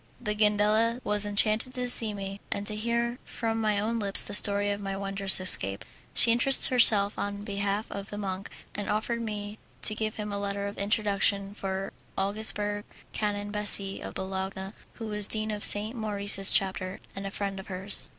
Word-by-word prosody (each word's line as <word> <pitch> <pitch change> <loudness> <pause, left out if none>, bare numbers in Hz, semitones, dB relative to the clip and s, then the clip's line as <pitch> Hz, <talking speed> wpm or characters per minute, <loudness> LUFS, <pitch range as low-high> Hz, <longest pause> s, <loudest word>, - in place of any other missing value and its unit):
The 210 -3 -4
Gandela 210 +2 +1
was 210 0 0
enchanted 215 +5 0
to 250 -1 -3
see 230 -3 +6
me, 195 -1 -8
and 200 - -4
to 210 - -2
hear 235 +2 -3
from 225 -1 -4
my 215 -1 -1
own 230 +3 -3
lips 200 -2 +10
the 205 - -8
story 205 0 +4
of 200 0 -5
my 195 -1 -5
wondrous 195 -1 0
escape. 100 - +2 0.3
She 230 - +6
interested 250 +4 +3
herself 215 -5 +4
on 205 0 -5
behalf 200 +1 -3
of 200 -1 -8
the 205 - -8
monk, 195 -1 -6 0.2
and 205 - -6
offered 235 +2 -3
me 210 -1 -7 0.2
to 215 - +3
give 215 0 -4
him 210 -1 -6
a 200 - -4
letter 200 0 -4
of 200 - -7
introduction 200 -1 -1
for 195 -1 -6 0.2
Augsburg 205 0 0 0.3
Canon 205 -1 -4
Bassi, 205 -2 +1
of - - -9
Bologna, 190 +1 -6 0.2
who 225 - -9
was 210 -1 -3
Dean 215 0 -1
of 210 -1 -6
St. 215 +4 +5
Maurice's 205 -3 0
Chapter, 190 -1 -2 0.2
and 195 0 -6
a - - -5
friend 195 -1 -5
of 190 - -11
hers. 190 +1 +3
205 Hz, 185 wpm, -26 LUFS, 200-215 Hz, 0.3 s, lips